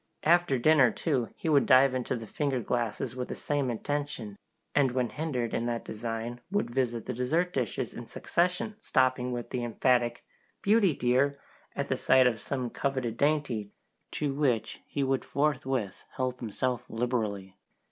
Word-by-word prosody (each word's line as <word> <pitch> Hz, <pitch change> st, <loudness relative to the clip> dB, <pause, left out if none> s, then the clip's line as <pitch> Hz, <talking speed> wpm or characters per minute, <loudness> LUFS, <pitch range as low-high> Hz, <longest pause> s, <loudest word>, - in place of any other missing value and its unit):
After 170 Hz, -4 st, +4 dB
dinner, 135 Hz, 0 st, +5 dB
too, 130 Hz, -7 st, -1 dB
he -, -, -6 dB
would 145 Hz, -3 st, +4 dB
dive 130 Hz, +1 st, +6 dB
into 130 Hz, 0 st, -1 dB
the 115 Hz, -2 st, -6 dB
finger 135 Hz, +3 st, -1 dB
glasses 120 Hz, 0 st, -2 dB
with 125 Hz, -1 st, -3 dB
the -, -, -5 dB
same 145 Hz, -3 st, -1 dB
intention, 125 Hz, -3 st, -3 dB, 0.4 s
and 135 Hz, -3 st, +3 dB
when 125 Hz, -2 st, 0 dB
hindered 135 Hz, -7 st, -2 dB
in 120 Hz, -, 0 dB
that 120 Hz, -1 st, -2 dB
design 115 Hz, +2 st, -4 dB
would 200 Hz, -10 st, -1 dB
visit 120 Hz, -3 st, -1 dB
the 125 Hz, -, -3 dB
dessert 160 Hz, +9 st, 0 dB
dishes 125 Hz, -6 st, -2 dB
in -, -, -8 dB
succession, 180 Hz, +5 st, -1 dB
stopping 130 Hz, -, +2 dB
with 120 Hz, 0 st, -5 dB
an 125 Hz, -, -1 dB
emphatic 120 Hz, 0 st, +1 dB, 0.4 s
"Beauty 200 Hz, -6 st, +4 dB
dear!" 130 Hz, +3 st, +2 dB, 0.4 s
at -, -, -2 dB
the -, -, 0 dB
sight 130 Hz, -1 st, +5 dB
of 115 Hz, -3 st, +2 dB
some 125 Hz, 0 st, -3 dB
coveted 130 Hz, -5 st, -2 dB
dainty, 140 Hz, -8 st, 0 dB, 0.4 s
to 145 Hz, -2 st, -1 dB
which 135 Hz, -6 st, 0 dB
he 140 Hz, -, -1 dB
would 135 Hz, 0 st, +1 dB
forthwith 135 Hz, -7 st, -1 dB
help 130 Hz, -1 st, -2 dB
himself 125 Hz, +2 st, -2 dB
liberally. 110 Hz, -5 st, -2 dB
130 Hz, 160 wpm, -29 LUFS, 120-145 Hz, 0.4 s, dive